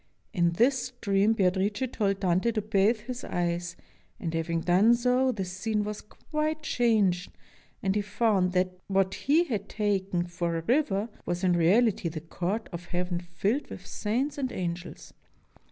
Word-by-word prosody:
In 170 -3 +2
this 250 +7 +2
stream 210 -4 +1
Beatrice 200 +4 +1
told 195 -4 0
Dante 185 +5 +2
to 215 - 0
bathe 210 +2 +2
his 250 +2 -6
eyes, 175 0 -2 0.4
and, 165 - -3
having 165 0 -1
done 190 +8 +5
so, 250 +2 +2
the 195 -6 -3
scene 210 +4 -2
was 210 0 -5
quite 305 +6 -3
changed, 210 - +2 0.5
and 190 -1 +2
he 210 - +1
found 205 -3 +1
that 185 0 0
what 195 -1 +1
he 305 +10 +3
had 210 - -4
taken 195 -4 0
for 175 -1 -2
a 165 - -4
river 225 - +1 0.2
was 175 +1 -2
in 180 -1 +4
reality 185 +2 +3
the 160 0 -5
Court 180 +7 -3
of 175 0 -7
Heaven 175 0 -2
filled 190 +10 -2
with 180 - -9
saints 255 +8 -2
and 260 -2 -1
angels. 175 0 -5
195 Hz, 160 wpm, -28 LUFS, 175-230 Hz, 0.5 s, done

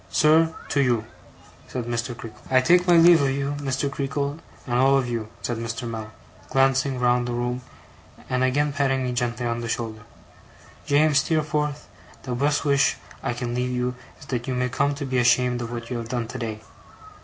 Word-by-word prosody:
'Sir, 160 +1 +4 0.2
to 140 - +1
you!' 120 -4 +1 0.6
said 125 -2 -4
Mr. 120 0 -3
Creakle. 115 -3 -10
'I 130 0 +5
take 180 +6 +4
my 175 - +6
leave 165 -1 +7
of 140 - +2
you, 140 +1 -1
Mr. 135 0 -1
Creakle, 140 +2 -2 0.3
and 120 -1 0
all 135 +1 +5
of 130 -2 0
you,' 115 -3 -3 0.2
said 120 - -2
Mr. 115 +1 -4
Mell, 110 -2 -6 0.4
glancing 135 0 +2
round 125 0 +2
the 120 - -2
room, 120 +1 -2 0.7
and 130 0 0
again 145 +3 +1
patting 135 -2 +1
me 125 - -1
gently 120 0 -1
on 120 0 -1
the 115 - -4
shoulders. 115 -2 -3 0.9
'James 145 0 +4
Steerforth, 150 -1 -1 0.4
the 125 - -4
best 145 +5 +1
wish 140 -1 +3 0.2
I - - -1
can 120 0 -4
leave 125 +1 -1
you 125 0 -1 0.3
is 145 - -13
that 125 -2 -3
you 130 - -1
may 125 0 0
come 140 +3 0
to 140 0 -4
be 130 -1 0
ashamed 125 0 +3
of 115 0 -5
what 115 0 -6
you 125 - -1
have 115 -1 -7
done 120 -2 -2
today. 115 -3 -5
125 Hz, 195 wpm, -24 LUFS, 120-140 Hz, 0.9 s, leave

